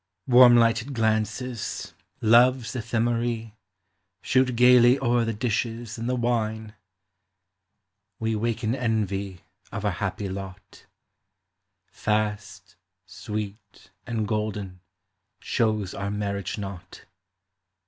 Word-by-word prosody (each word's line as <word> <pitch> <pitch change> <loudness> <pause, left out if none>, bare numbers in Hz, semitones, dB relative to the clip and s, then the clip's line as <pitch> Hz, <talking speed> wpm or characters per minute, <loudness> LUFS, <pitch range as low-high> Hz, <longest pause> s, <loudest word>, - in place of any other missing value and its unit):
Warm 125 -1 +7
lighted 115 +3 +2
glances, 110 +2 -2 0.3
Love's 120 +2 +4
Ephemerae, 115 0 -1 0.7
Shoot 130 -1 +2
gayly 125 +1 +6
o'er 120 -2 +1
the 115 - -1
dishes 115 0 -3
and 115 +2 -3
the 125 - +1
wine. 110 -3 -1 1.4
We 110 0 -1
waken 115 +1 -1
envy 100 -7 -2 0.3
of 100 0 -5
our 105 - +2
happy 95 +2 -3
lot. 95 -1 -9 1.0
Fast, 105 -4 -3 0.3
sweet, 105 +2 -7 0.2
and 110 -3 -2
golden, 105 -3 -3 0.6
shows 110 -4 -1
our 100 0 -4
marriage 100 -2 -3
knot. 100 -3 -8
110 Hz, 95 wpm, -25 LUFS, 105-120 Hz, 1.4 s, Warm